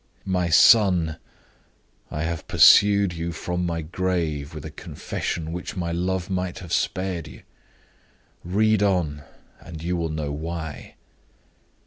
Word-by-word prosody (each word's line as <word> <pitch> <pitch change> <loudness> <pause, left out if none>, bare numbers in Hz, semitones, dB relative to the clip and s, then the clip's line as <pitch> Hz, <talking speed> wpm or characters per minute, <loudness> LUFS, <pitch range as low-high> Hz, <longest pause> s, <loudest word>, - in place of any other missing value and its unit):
"My 90 -2 0
son! 90 -5 +5 0.9
I 75 - -4
have 85 0 -4
pursued 100 -3 +6
you 85 +1 -4
from 90 +1 -3
my 85 -1 -3
grave 80 -3 -2
with 75 - -8
a 80 - -7
confession 80 +1 -5
which 90 +4 -6
my 85 -2 -2
love 90 +1 -2
might 90 -2 -3
have 90 -3 -7
spared 95 -4 -1
you. 70 - -13 1.0
Read 105 +4 +2
on, 90 -8 0 0.4
and 80 -1 -10
you 90 +1 -1
will 85 -2 -2
know 75 -2 -3
why. 80 +1 -6
85 Hz, 130 wpm, -24 LUFS, 80-95 Hz, 1.0 s, pursued